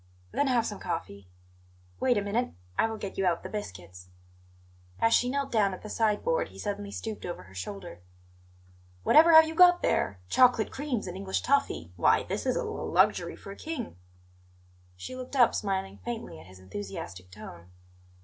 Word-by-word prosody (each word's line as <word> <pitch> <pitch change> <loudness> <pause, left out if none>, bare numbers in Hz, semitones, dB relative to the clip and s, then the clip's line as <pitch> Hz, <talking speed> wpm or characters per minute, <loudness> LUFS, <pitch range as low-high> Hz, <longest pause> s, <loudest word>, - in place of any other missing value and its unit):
"Then 285 - +1
have 240 -3 +2
some 205 -3 -5
coffee. 100 - -5 0.7
Wait 250 -3 +2
a 205 - 0
minute; 225 +5 -1 0.2
I - - +3
will 225 0 -5
get 200 -2 -6
you 190 - +2
out 170 -1 0
the - - -6
biscuits." 90 - -8 0.9
As 225 0 +3
she 245 - +3
knelt 280 +1 -2
down 200 -4 +2
at - - -15
the 215 - -7
side 215 -2 +1
board - - +1
he - - -15
suddenly 205 -1 -4
stooped 215 +1 -6
over 175 - -6
her 95 0 -17
shoulder. 95 -1 -7 1.0
"Whatever 320 - +7
have 320 0 +10
you 320 - -4
got 355 +1 +6
there? 95 0 +1
Chocolate 245 - +4
creams 265 -6 -3
and 180 -1 -6
English 190 0 -2
toffee! 275 - 0
Why, - - +4
this - - -4
is - - +1
l - - -4
luxury - - +2
for 195 - -10
a - - -8
king!" 305 - -6 1.0
She 90 - -8
looked 255 +2 -7
up, 245 -3 +5
smiling 195 -1 -2
faintly 230 - -6
at 90 - -14
his 95 0 -14
enthusiastic 95 -1 -8
tone. 90 -2 -11
205 Hz, 180 wpm, -28 LUFS, -, 1.0 s, have